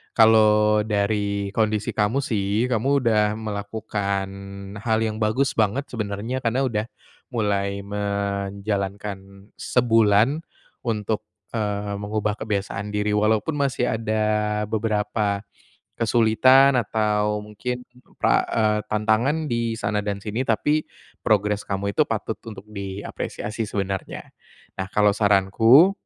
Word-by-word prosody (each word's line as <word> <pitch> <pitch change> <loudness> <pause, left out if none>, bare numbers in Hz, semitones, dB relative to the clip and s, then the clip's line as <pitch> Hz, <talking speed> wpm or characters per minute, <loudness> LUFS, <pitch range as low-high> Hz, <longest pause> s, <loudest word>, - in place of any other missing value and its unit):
kalau 105 -1 +5
dari 100 -1 0
kondisi 110 0 0
kamu 110 +6 +1
sih, 105 +1 0
kamu 135 +5 +2
udah 105 -2 +3
melakukan 100 -2 -3 0.5
hal 110 0 +1
yang 110 -1 -2
bagus 125 +6 +1
banget 110 +5 +2
sebenernya 110 +2 -3
karena 125 +1 0
udah 110 -5 -1 0.5
mulai 100 -3 0
menjalankan 100 0 -3
sebulan 115 +2 +3 0.5
untuk, 110 -1 -1 0.3
eee, 105 -2 -2
mengubah 105 +1 -2
kebiasaan 100 0 -3
diri, 105 0 0
walaupun 105 +7 +1
masih 135 -3 0
ada 110 -1 -1 0.5
beberapa 105 -2 0 0.5
kesulitan 125 +4 +5
atau 105 -1 0
mungkin 125 +4 -5
ke 125 0 -25
eee, 105 -1 +2
tantangan 110 +9 +1
di 115 -3 -1
sana 105 -1 -1
dan 100 -1 -3
sini, 110 +3 -3
tapi 145 +5 +1 0.3
progres 105 0 +1
kamu 100 0 -2
itu - - +2
patut - - -3
untuk 100 -3 -9
diapresiasi 100 +2 -5
sebenarnya. 100 -1 -3 0.6
Nah, 95 - -3
kalau 105 0 +3
saranku, 105 - +5
105 Hz, 110 wpm, -23 LUFS, 100-115 Hz, 0.6 s, kalau